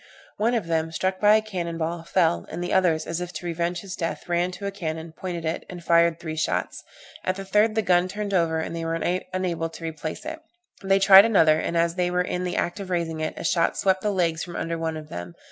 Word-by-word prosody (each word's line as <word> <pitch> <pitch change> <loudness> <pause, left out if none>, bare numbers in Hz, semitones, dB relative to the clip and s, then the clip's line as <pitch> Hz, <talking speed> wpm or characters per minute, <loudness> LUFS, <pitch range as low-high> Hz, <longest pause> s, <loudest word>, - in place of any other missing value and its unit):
One 230 +3 +1
of 220 -7 -1
them, 165 -1 -1
struck 185 +3 -1
by 210 +1 +6
a 215 - +2
cannon 175 -6 -4
ball, 165 +1 -2
fell, 165 - +1
and 175 +2 -4
the 175 - -2
others, 170 -4 +2
as 165 +1 -3
if 180 0 -5
to - - -7
revenge 170 +1 -2
his 195 -1 -7
death, 165 +1 -4
ran 175 +1 +1
to 190 +3 -7
a 200 - -1
cannon, 160 -4 -5
pointed 175 -3 -5
it, 160 - -2
and 175 -1 -8
fired 170 0 +3
three 160 -2 -5
shots. 155 - -2 0.4
At 185 - 0
the 195 0 -7
third, 210 +3 +3
the 220 - +1
gun 180 -1 +3
turned 205 +1 -4
over, 165 -3 +2
and 160 +1 -3
they 165 - -4
were 165 0 -1
unable 180 -1 -2
to 165 +1 -11
replace 160 - -5
it. 320 0 -5 0.4
They 195 0 +3
tried 195 +1 +9
another, 160 -8 +4
and 170 - -2
as 170 0 +2
they 180 0 0
were 180 0 +1
in 180 0 -3
the 180 - -2
act 175 - -1
of 195 -2 -6
raising 170 -3 -1
it, 155 0 -3
a - - -6
shot 165 -2 +1
swept 190 -1 +2
the 210 - 0
legs 170 -4 0
from 175 - -8
under 165 0 -2
one 165 -1 -3
of 155 -1 -9
them. 85 - -7
175 Hz, 250 wpm, -25 LUFS, 165-190 Hz, 0.4 s, tried